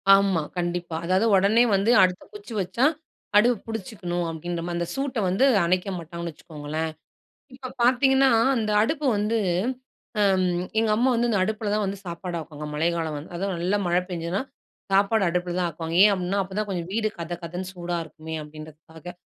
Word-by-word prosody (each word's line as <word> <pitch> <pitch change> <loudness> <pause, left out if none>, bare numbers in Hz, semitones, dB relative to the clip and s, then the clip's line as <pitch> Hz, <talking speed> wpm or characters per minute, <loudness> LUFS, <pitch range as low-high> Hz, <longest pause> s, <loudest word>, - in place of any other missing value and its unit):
ஆமா. 195 -4 +2 0.2
கண்டிப்பா. 175 -1 -2
அதாவது 185 +5 +2
உடனே 200 +5 +4
வந்து 200 +4 +2
அடுத்த 185 0 +1
குச்சி 415 - -9
வச்சா, 190 +8 0 0.5
அடுப்பு 235 +3 +5
பிடிச்சிக்கணும் 180 -5 -4
அப்பிடின்றமாரி, 170 +1 -4
அந்த 170 - -1
சூட்ட 270 -3 -2
வந்து 195 +9 +3 0.2
அணைக்க 180 +3 +1
மாட்டாங்கன்னு 170 0 -6
வச்சுக்கோங்களேன்! 155 0 -5 0.6
இப்ப 260 -1 -8
பார்த்தீங்கன்னா, 265 +2 +4 0.3
அந்த 215 -3 0
அடுப்பு 300 +5 -1
வந்து 210 +3 0 0.8
அம். 190 -2 +3 0.3
எங்க 225 -1 +1
அம்மா 245 +4 +2
வந்து 240 0 +1
இந்த 215 - +2
அடுப்புல 215 +1 -2
தான் 210 0 +1
வந்து 200 0 -3
சாப்பாடு 175 0 -5
ஆக்குவாங்க. 150 -2 -8
மழை 155 +3 +1
காலம் 160 -2 -2
வந் 145 +3 -7
அதுவும் 195 +2 -2
நல்ல 180 +4 +1
மழை 175 +1 +2
பெஞ்சதுனா, 170 +2 -2 0.5
சாப்பாடு 200 +2 +3
அடுப்புல 175 0 -1
தான் 180 - +1
ஆக்குவாங்க. 165 +1 -5
ஏன் 210 - +6
அப்புட்ன்னா, 185 +1 -1
அப்ப 190 0 -11
தான் 215 0 -1
கொஞ்சம் 175 -2 -3
வீடு 215 +1 0
கதகதன்னு 175 +2 -5
சூடா 175 -1 -4
இருக்குமே! 160 0 -9
அப்பிடின்றதுக்காக. 155 +3 -11
180 Hz, 165 wpm, -25 LUFS, 170-215 Hz, 0.8 s, ஏன்